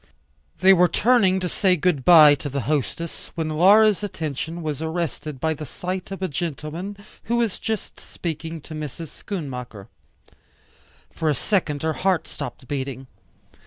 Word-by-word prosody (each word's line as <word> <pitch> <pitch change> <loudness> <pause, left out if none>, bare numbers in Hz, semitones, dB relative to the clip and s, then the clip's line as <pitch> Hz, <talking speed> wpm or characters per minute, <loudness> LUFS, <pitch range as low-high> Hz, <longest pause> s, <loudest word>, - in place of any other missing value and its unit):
They 190 +1 +8
were 180 -1 +5
turning 195 0 +3
to 180 - -1
say 185 +1 +2
good 165 -5 +1
by 155 -3 +9
to 145 0 -4
the 140 0 -2
hostess, 150 +5 -3
when 160 -2 -2
Laura's 200 +6 +5
attention 165 -3 -4
was 150 -2 -3
arrested 160 -3 -3
by 160 +2 0
the 155 - -7
sight 185 +1 -5
of 195 -1 -6
a - - +1
gentleman 170 +5 -5 0.3
who 235 - 0
was 230 -4 0
just 220 -3 -4
speaking 165 -1 -6
to 155 - -10
Mrs. 155 +1 -6
Schoonmaker. 125 - -7 1.2
For 160 -2 -1
a 150 - +2
second 155 - 0
her 160 0 +1
heart 185 +4 0
stopped 130 - -8
beating. 135 -1 -4
160 Hz, 155 wpm, -23 LUFS, 150-185 Hz, 1.2 s, by